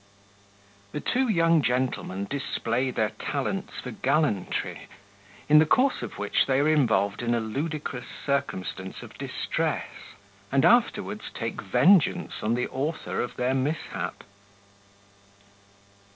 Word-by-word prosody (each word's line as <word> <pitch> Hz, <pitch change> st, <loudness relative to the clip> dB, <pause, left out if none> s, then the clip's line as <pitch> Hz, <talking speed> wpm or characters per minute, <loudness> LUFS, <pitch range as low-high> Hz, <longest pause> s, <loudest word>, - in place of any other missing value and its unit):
The -, -, -2 dB
two 260 Hz, -, +1 dB
young 165 Hz, -6 st, +4 dB
Gentlemen 125 Hz, -6 st, -1 dB
display 130 Hz, -2 st, -1 dB
their 110 Hz, -3 st, 0 dB
talents 190 Hz, +9 st, -2 dB
for -, -, -5 dB
Gallantry, 150 Hz, -, -1 dB, 0.6 s
in 150 Hz, +1 st, +7 dB
the 155 Hz, -, +6 dB
course 260 Hz, -, +3 dB
of -, -, -6 dB
which 105 Hz, 0 st, +1 dB
they 135 Hz, -1 st, +3 dB
are 145 Hz, -, +3 dB
involved 120 Hz, -11 st, +2 dB
in 120 Hz, 0 st, +1 dB
a -, -, +1 dB
ludicrous 140 Hz, +3 st, -4 dB, 0.2 s
circumstance 95 Hz, -9 st, -2 dB
of -, -, -12 dB
Distress, -, -, -2 dB, 0.6 s
and 135 Hz, 0 st, +3 dB
afterwards 215 Hz, -3 st, +2 dB
take 115 Hz, -1 st, -4 dB
Vengeance 165 Hz, -, +3 dB
on 110 Hz, +2 st, +1 dB
the 125 Hz, -, -1 dB
Author 145 Hz, +5 st, -2 dB
of 120 Hz, -, -4 dB
their 125 Hz, +1 st, 0 dB
Mishap. 140 Hz, +4 st, -2 dB
135 Hz, 125 wpm, -26 LUFS, 120-160 Hz, 0.6 s, in